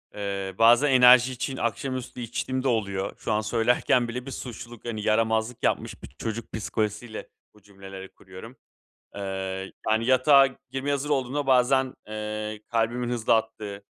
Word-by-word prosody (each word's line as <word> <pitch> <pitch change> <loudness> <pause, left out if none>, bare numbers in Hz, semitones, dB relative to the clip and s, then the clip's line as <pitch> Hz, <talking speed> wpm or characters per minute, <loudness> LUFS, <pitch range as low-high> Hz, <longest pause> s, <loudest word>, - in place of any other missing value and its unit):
Eee, 100 -2 -4
bazen 120 +5 +5
enerji 125 0 +7
için 130 +2 -4
akşamüstü 125 +2 -3
içtiğim 130 +2 -3
de 135 - 0
oluyor. 100 -5 -1
Şu 110 - -4
an 105 0 +2
söylerken 120 +2 +2
bile 125 +2 -5
bir 135 - -7
suçluluk, 120 -2 -8
hani, 110 -2 -4
yaramazlık 110 +2 0
yapmış - - -1
bir - - -7
çocuk 115 +1 -6
psikolojisiyle 110 +1 -3 0.2
bu 105 - -22
cümleleri 95 -1 -11
kuruyorum. 95 +7 -13 0.6
Eee, 95 -1 -4 0.2
yani, 110 +1 +2
yatağa 135 +2 +6 0.2
girmeye 135 +2 -2
hazır 140 +1 -2
olduğumda 140 0 -1
bazen, 130 0 +3
eee, 105 0 -5
kalbimin 120 +1 0
hızlı 115 -2 +2
attığı, 105 -2 -4
115 Hz, 145 wpm, -26 LUFS, 105-125 Hz, 0.6 s, enerji